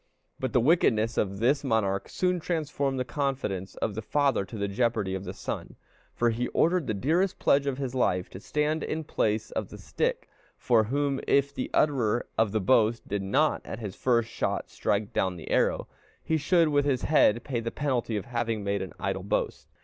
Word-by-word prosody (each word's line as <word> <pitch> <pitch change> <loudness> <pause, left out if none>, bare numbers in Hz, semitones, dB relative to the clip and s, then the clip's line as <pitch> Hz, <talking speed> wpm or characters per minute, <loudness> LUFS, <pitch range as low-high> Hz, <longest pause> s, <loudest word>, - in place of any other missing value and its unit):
But 130 -2 -2
the 125 - +3
wickedness 115 -6 +3
of 100 -1 0
this 130 +8 +2
monarch 105 -6 0
soon 180 -1 0
transformed 145 -5 -1
the 125 - -1
confidence 120 -8 -2
of 105 - -2
the 110 - -4
father 140 -3 +1
to 105 +4 -8
the 100 -1 -1
jeopardy 105 -2 0
of 95 0 -4
the - - -4
son, - - -5 0.4
for 120 -1 +2
he 120 +2 -1
ordered 175 -2 +1
the 110 - -1
dearest 170 - +1
pledge 140 0 +3
of 135 -2 -1
his 135 -3 -3
life 90 -8 +1
to 95 - -8
stand 150 +8 -1
in 160 +1 -3
place 110 -6 -1
of - - -3
the - - -10
stick, - - -2 0.3
from 115 -3 +3
whom, 140 +1 0
if 140 0 +3
the 130 - -3
utterer 120 -6 +2
of 110 -2 +2
the 110 - +1
boast 115 +2 +2
did 100 -1 -2
not 135 +11 +1
at - - -6
his 105 -4 -6
first 115 -3 +1
shot - - -2
strike 105 0 -1
down 95 -1 0
the 85 - -8
apple, - - +2 0.4
he 160 - 0
should 165 +2 +3
with 145 -1 +2
his 135 -4 0
head 120 -6 +4
pay 130 -5 -2
the 115 0 -3
penalty 120 -5 -1
of 100 - -4
having 115 -3 -2
made 100 0 -1
an 95 - -6
idle - - -2
boast. - - -2
120 Hz, 205 wpm, -28 LUFS, 105-140 Hz, 0.4 s, head